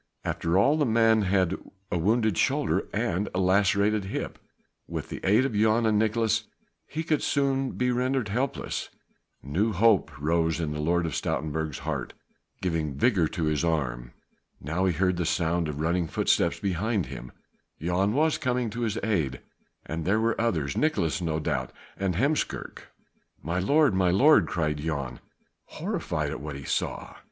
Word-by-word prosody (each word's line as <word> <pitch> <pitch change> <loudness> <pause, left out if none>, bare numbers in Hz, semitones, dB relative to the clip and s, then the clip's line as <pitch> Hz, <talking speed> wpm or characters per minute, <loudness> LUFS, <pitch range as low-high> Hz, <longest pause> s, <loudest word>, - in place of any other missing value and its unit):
After 85 +2 0
all 140 +10 +4
the 150 - +2
man 115 -1 +4
had 95 -2 +2 0.4
a - - +1
wounded 110 +3 +2
shoulder - - +1
and 95 +5 -1
a - - +1
lacerated 100 +2 +2
hip; 95 - -4 0.5
with - - -5
the - - -5
aid 110 +7 +4
of 135 - -2
Jan 110 +2 +3
and 110 -1 +3
of 110 - +3
Nicolaes 110 0 0 0.4
he 160 +2 -4
could 155 -2 +1
soon 135 -1 0
be 125 0 0
rendered 125 -2 0
helpless. 125 +6 -2 0.5
New 95 +11 0
hope 110 +1 +4
rose 80 +2 +1
in 80 -3 -2
the 75 - -4
Lord 85 +3 +1
of 80 - -3
Stoutenburg's 80 -1 -2
heart, - - -3 0.5
giving 80 -6 -1
vigour 90 - +3
to 85 +1 -4
his 75 0 0
arm. - - -1 0.5
Now 80 +7 -1
he 90 - +2
heard 90 +2 +1
the 90 - 0
sound 85 -1 0
of 75 -1 -5
running 85 +2 0
footsteps - - +1
behind 100 +1 -1
him; 60 -1 -8 0.5
Jan 90 +5 +1
was 155 +4 +2
coming 125 -3 -1
to 120 +2 -5
his 110 -3 -1
aid 80 - 0 0.4
and 80 +1 -4
there 100 +6 +2
were 115 0 +1
others; 80 -13 0
Nicolaes 100 - +1
no 80 -2 -1
doubt 75 - -2 0.2
and 95 -3 -1
Heemskerk. 140 - -1 0.6
"My 85 +4 -1
lord! 145 +6 +3
my 95 -1 +2
lord!" 105 - +5
cried 75 -3 -1
Jan, 70 -5 -3 0.5
horrified 150 - -3
at 80 - -5
what 75 -1 -6
he 70 - -8
saw. - - -3
95 Hz, 165 wpm, -27 LUFS, 80-115 Hz, 0.6 s, lord